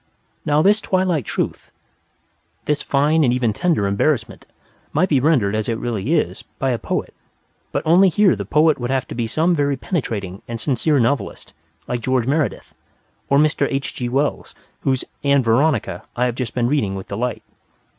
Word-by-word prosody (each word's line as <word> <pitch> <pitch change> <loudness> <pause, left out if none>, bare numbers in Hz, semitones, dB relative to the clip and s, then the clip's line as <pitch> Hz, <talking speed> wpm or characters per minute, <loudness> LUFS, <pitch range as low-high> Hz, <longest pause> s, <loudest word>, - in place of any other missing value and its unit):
Now, 150 +1 +3
this 210 +3 +4
twilight 185 - 0
truth, - - -3 1.0
this 150 0 0
fine 150 +3 +2
and 125 - +3
even 120 -3 +1
tender 165 - +1
embarrassment, 110 +5 -1 0.5
might 175 +5 +2
be 140 - +3
rendered, 130 -8 +2
as 110 +1 -1
it 115 - -1
really 120 - -1
is, 155 - -1 0.2
by 135 -1 0
a 120 - -1
poet, - - -3 0.7
only 180 +4 +6
here 190 - +3
the 100 - -4
poet 150 - +3
would 120 0 -3
have 130 -1 -1
to - - -5
be 115 -1 -2
some 160 +9 +1
very 145 -3 +1
penetrating 105 - -3
and 115 -1 -5
sincere 145 +4 +1
novelist, 130 +4 -1 0.3
like 120 -1 -2
George 130 0 +1
Meredith, 145 +2 -1 0.6
or 140 - +4
Mr. 150 -1 +2
H. 135 0 -3
G. 120 -1 -3
Wells, 140 +3 -1 0.2
whose 130 -2 0 0.2
"Ann 140 -1 +3
Veronica" 120 +2 +1
I 125 - +1
have 125 - 0
just 120 -1 -5
been 120 -1 +1
reading 120 -7 0
with 95 - -7
delight. 115 +4 -3
135 Hz, 175 wpm, -20 LUFS, 120-155 Hz, 1.0 s, only